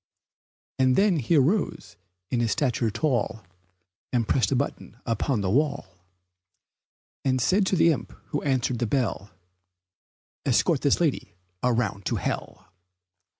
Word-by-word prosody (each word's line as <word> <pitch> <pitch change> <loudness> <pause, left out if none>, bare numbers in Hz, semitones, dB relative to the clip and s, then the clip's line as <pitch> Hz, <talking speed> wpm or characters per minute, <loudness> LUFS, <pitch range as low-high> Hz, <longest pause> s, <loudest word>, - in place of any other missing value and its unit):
And 130 -1 +4
then 195 -5 +3
he 140 +6 +1
arose 160 +9 +1 0.4
in 125 - +1
his 115 -2 +1
stature 120 -5 0
tall, 115 -2 -1 0.7
And 120 -3 0
pressed 130 +1 +2
a - - +2
button 125 -4 -3
upon 115 0 0
the 95 - -1
wall, 140 - 0 1.3
And 130 -1 +1
said 190 - +2
to 190 - +2
the 165 -1 +5
imp 150 - -3 0.2
who 145 - -2
answered 130 -3 0
the 120 - 0
bell, 110 -4 -1 1.1
"Escort - - +2
this - - +2
lady - - -1 0.3
around 115 -6 0
to - - 0
hell!" - - -5
130 Hz, 135 wpm, -26 LUFS, 115-145 Hz, 1.3 s, the